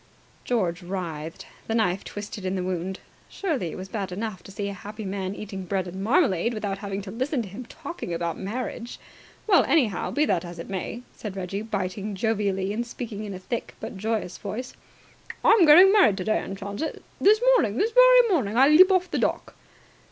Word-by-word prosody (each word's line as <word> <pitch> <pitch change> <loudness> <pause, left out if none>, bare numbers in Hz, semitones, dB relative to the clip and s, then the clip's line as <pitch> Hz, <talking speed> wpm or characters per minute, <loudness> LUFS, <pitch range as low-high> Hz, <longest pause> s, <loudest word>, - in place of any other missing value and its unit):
George 185 -9 0
writhed. 170 -4 -5 0.2
The 225 - -1
knife 195 -4 +1
twisted 205 -1 -7
in 185 +1 -1
the 185 - -2
wound. 185 +1 -3 0.3
Surely 305 - -2
it - - -7
was 185 +1 -7
bad 195 -2 -4
enough 205 0 -4
to - - -12
see 200 +1 -4
a 200 - -4
happy 210 +2 -8
man 190 0 -3
eating 195 -3 -6
bread 185 0 -2
and 190 +2 -6
marmalade 235 - +2
without 200 -2 -3
having 200 -1 -4
to 195 - -7
listen 255 +3 -1
to - - -8
him 210 +7 -8
talking 320 - -7
about 170 0 -2
marriage. 235 +3 -5 0.5
"Well, 390 -5 +5
anyhow, 240 - +1
be 300 +1 +1
that 185 - +1
as 175 -1 -8
it 165 - -7
may," 195 +5 -4
said 205 -3 -7
Reggie, 195 +1 -4
biting 200 -1 -3
jovially 200 -2 0
and 235 +3 -1
speaking 230 -3 -6
in 200 -2 -6
a - - -5
thick 230 +6 -5
but - - -7
joyous 215 -2 -3
voice. 235 +5 -5 0.7
"I'm 410 -7 +6
getting 360 +6 +9
married 380 - +5
today, 215 +3 0
and 195 - -6
chance 200 +1 -6
it. 315 - -4 0.2
This 425 +2 +5
morning, 225 - +2
this 445 - +1
very - - +7
morning, 235 - +1
I 270 +3 +7
leap 370 +6 +8
off 365 -1 +2
the - - 0
dock!" - - -1
205 Hz, 200 wpm, -25 LUFS, 190-245 Hz, 0.7 s, getting